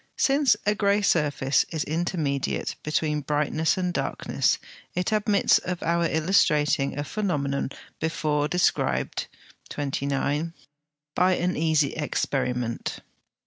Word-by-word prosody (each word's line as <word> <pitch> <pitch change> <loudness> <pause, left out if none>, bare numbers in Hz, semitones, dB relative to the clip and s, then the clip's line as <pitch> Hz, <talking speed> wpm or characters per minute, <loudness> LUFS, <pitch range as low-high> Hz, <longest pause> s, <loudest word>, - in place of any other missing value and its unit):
Since 275 -4 +4
a 210 - +3
grey 205 0 +2
surface 145 -6 +2
is 160 -3 -2
intermediate 155 -4 -1
between 150 0 0
brightness 150 +4 0
and 180 -1 -1
darkness, - - 0 0.4
it 180 +3 -1
admits 210 -1 +3
of 180 -1 -4
our 170 0 +1
illustrating 150 -4 +2
a 145 - -1
phenomenon 145 -8 -1 0.3
before 150 -2 0
described 180 +3 0 0.4
(29) 145 +3 -2 0.6
by 185 +3 +3
an 180 +1 0
easy 155 -3 +2
experiment. 125 -5 -2
155 Hz, 105 wpm, -25 LUFS, 145-180 Hz, 0.6 s, Since